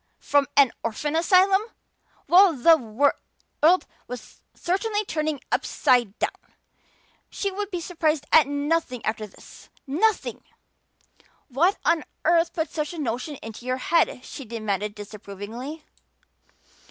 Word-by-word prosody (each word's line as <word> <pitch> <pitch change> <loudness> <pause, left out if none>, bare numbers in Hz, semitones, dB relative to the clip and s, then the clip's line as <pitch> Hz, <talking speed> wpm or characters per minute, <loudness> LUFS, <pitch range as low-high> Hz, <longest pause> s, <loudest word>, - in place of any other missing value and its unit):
From 285 -1 +2
an 275 -4 +6
orphan 290 +7 -2
asylum! 375 +4 +4 0.7
Well, 370 0 +7
the 325 +6 +6
world 285 +6 0 0.2
was 250 -2 -10
certainly 415 +4 -1
turning 310 -4 -2
upside 240 -5 +1
down! - - -4 0.7
She 400 - -3
would 405 +1 -4
be 360 -4 -3
surprised 320 -4 -1
at 315 -3 +6
nothing 285 -3 -1
after 215 0 -2
this! - - -16 0.2
Nothing! 370 +11 0 1.1
"What 330 +10 +2
on 335 -2 +3 0.2
earth 335 +1 +3
put 325 -2 -3
such 305 +1 -3
a - - -8
notion 265 +1 -3
into 225 +2 -9
your 255 0 0
head?" 315 -2 +1
she 275 - -8
demanded 210 -3 -3
disapprovingly. 215 +8 -8
295 Hz, 120 wpm, -24 LUFS, 240-340 Hz, 1.1 s, Well